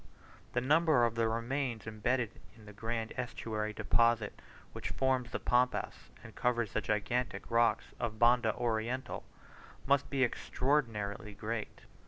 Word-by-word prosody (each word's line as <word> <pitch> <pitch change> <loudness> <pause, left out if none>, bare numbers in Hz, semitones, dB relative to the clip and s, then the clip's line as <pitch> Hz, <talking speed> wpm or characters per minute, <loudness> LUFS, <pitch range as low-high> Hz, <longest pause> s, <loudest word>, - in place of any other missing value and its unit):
The 120 - +1
number 150 -1 +4
of 115 - 0
the 115 -1 +1
remains 115 +1 -2
embedded 110 +2 0 0.2
in 110 -2 -16
the 105 - -11
grand 115 +1 -3
estuary 110 -3 -3
deposit 115 0 +2 0.3
which - - -4
forms 130 -2 +1
the - - -3
Pampas 125 +1 0
and 115 -2 -11
covers 120 -3 0
the 110 - +1
granitic 110 +5 -1
rocks 115 0 +3
of 110 -2 -2
Banda 120 -1 +4
Oriental, 120 +2 -2 0.6
must 140 0 +3
be 135 -2 +2
extraordinarily 115 -6 -1
great. 110 +1 -4
115 Hz, 135 wpm, -33 LUFS, 110-125 Hz, 0.6 s, number